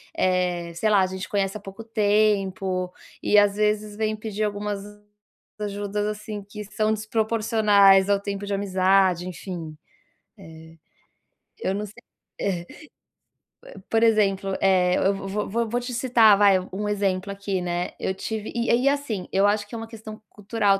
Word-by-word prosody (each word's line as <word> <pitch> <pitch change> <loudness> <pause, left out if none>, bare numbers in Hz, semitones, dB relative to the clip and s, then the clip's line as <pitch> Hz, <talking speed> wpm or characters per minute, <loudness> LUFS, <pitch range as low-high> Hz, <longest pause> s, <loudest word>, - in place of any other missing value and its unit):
eh, 180 -2 0
sei 195 +6 0
lá, 205 -2 +5
a 185 - +2
gente 185 0 -6
conhece 195 0 -1
há - - -12
pouco 195 +2 -10
tempo 205 -4 +1 0.3
e 210 - +3
às 205 -1 +5
vezes 210 0 0
vem 215 0 0
pedir 215 -1 -4
algumas 205 -1 -2 0.8
ajudas, 205 0 -3
assim, 210 0 -5
que 210 +1 -8
são 215 +2 0
desproporcionais 215 -3 +3
ao 200 -1 +3
tempo 200 0 -5
de 200 - -3
amizade, 190 -2 +2
enfim. 175 -3 -7 1.9
Eh, - - -1
eu - - -1
não 205 +1 -3
sei 205 - -14 0.5
É, 190 -3 -1 1.1
eh, - - -12
por 225 0 +2
exemplo, 195 -4 +2
eh, 185 -2 +3
eu 195 - +2
vo 195 0 -7 0.2
vo - - -9
vo 230 +2 -1
vou 240 +2 0
te 245 +1 -6
citar, 235 -4 +5
vai, 200 -1 +6 0.2
um 210 +2 -2
exemplo 200 -1 -1
aqui, 200 -1 -3
né, 175 0 -2
eu 190 - -1
tive 215 +2 -5
e 235 0 -1 0.2
e 275 - +5
assim, 280 -10 -2
eu 195 +1 +3
acho 205 0 +1
que 230 - -9
é - - -4
uma 225 0 -6
questão 220 -1 -10
cultural 205 -1 0
205 Hz, 165 wpm, -24 LUFS, 195-215 Hz, 1.9 s, vai